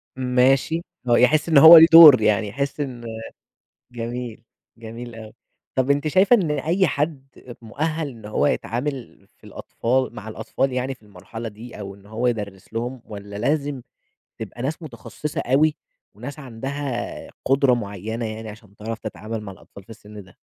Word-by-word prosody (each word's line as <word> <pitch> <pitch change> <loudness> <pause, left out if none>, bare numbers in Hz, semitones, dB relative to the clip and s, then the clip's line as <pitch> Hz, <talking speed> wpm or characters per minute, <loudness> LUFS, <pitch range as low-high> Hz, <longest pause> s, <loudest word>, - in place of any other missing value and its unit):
ماشي، 130 +5 +2 0.3
هو 120 - +4
يحس 150 +7 +3
إن 155 - +4
هو 160 +4 +11
ليه 160 +1 +9
دور 155 -7 +10
يعني 105 0 +2
يحس 140 +7 -4
إن 125 -4 -5 0.9
جميل. 120 -1 -6 0.3
جميل 115 +1 -9
أوي. 110 -1 -11 0.4
طب 130 +1 +2
أنتِ 145 +2 0
شايفة 190 +9 +5
إن 175 -8 0
أي 165 +6 +1
حد 145 -1 -2 0.4
مؤهل 155 +6 -3
إن 115 -5 -13
هو 105 - 0
يتعامل 130 +2 -4
في - - -41
الأطفال 130 +3 -2
مع 105 - -9
الأطفال 130 +4 -2
يعني 130 +1 -2
في - - -31
المرحلة 110 +4 -9
دي 110 +2 -12
أو 100 -1 -7
إن 100 0 -20
هو 110 +4 -2
يدرس 105 -5 -5
لهم، 120 +2 -4
والّا 100 -1 -10
لازم 140 +2 -1 0.6
تبقى 120 - -7
ناس 150 +5 -3
متخصصة 150 +2 -6
أوي. 150 +5 +2 0.4
وناس 145 +1 -9
عندها 135 0 -5 0.2
قدرة 135 -1 +3
معينة 110 +1 -5
يعني 110 0 -7
عشان 105 -1 -13
تعرف 110 +1 -6
تتعامل 110 0 -6
مع 100 -2 -8
الأطفال 100 +1 -15
في - - -20
السن 105 -1 -12
ده؟ 95 - -21
125 Hz, 160 wpm, -22 LUFS, 110-140 Hz, 0.9 s, هو